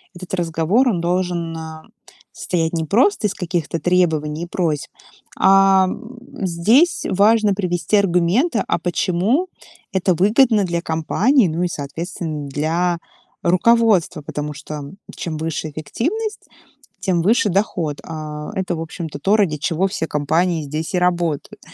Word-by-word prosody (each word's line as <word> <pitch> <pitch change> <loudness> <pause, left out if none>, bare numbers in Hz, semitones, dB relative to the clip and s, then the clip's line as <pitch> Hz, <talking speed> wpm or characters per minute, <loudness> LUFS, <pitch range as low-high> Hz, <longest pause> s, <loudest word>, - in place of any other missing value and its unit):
этот 175 +1 -10
разговор, 175 +8 +1
он 190 -7 0
должен, 175 -1 -1
а, 160 -1 -8 0.5
состоять 165 -2 -1
не 165 -1 -1
просто 240 - +2
из 200 - -4
каких-то 170 -3 -3
требований 160 -2 +1
и - - -3
просьб, 165 -4 -2 0.5
а 195 0 +5 0.6
здесь 220 - +3
важно 210 +1 +3
привести 180 0 0
аргументы, 200 - +2
а - - +1
почему 185 - 0 0.4
это 190 -1 +1
выгодно 210 +4 +4
для 170 -2 -1
компании, 195 - +2
ну 165 +2 -2
и, - - +2
соответственно, 155 0 -5
для 165 +5 0 0.4
руководства, 195 -1 +3
потому 150 +1 -5
что 150 0 -7 0.3
чем 160 -3 -4
выше 155 0 -3
эффективность, 365 - -3 0.5
тем 175 -4 0
выше 215 +2 +3
доход. 175 -6 -1
А, 155 -2 -6
это, 185 -2 -2
в 160 - -5
общем-то, 165 -2 -6
то, 195 +8 +3
ради 180 -8 +1
чего 170 +5 0
все 185 -4 -3
компании 160 +4 0
здесь 155 +4 -4
и 180 - +2
работают. 175 -4 -1
175 Hz, 135 wpm, -20 LUFS, 160-195 Hz, 0.6 s, а